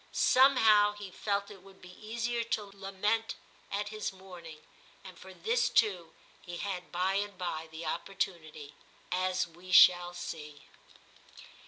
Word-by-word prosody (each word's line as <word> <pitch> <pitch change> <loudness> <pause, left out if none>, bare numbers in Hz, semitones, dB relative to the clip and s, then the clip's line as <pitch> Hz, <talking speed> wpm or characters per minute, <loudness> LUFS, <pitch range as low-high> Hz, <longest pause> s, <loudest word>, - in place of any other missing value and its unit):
Somehow 225 -6 +5
he 205 -2 -9
felt 200 +1 -2
it 195 -3 -13
would 195 0 -17
be 180 0 -13
easier 235 +2 -2
to 225 -2 -2
lament 200 +3 -2 0.4
at 205 +1 -2
his 215 0 -4
mourning; 180 -5 -12 0.4
and 185 -2 -11
for 190 - -13
this 235 +8 0
too 185 -9 +1 0.3
he 175 -1 -8
had 180 -2 -5
by 185 +2 0
and 205 -1 -3
by 160 -3 -4
the 160 +1 -8
opportunity, 155 -4 -4 0.4
as 185 0 0
we 175 +2 -13
shall 175 -1 +7
see. 150 -4 -8
190 Hz, 140 wpm, -31 LUFS, 175-210 Hz, 0.4 s, shall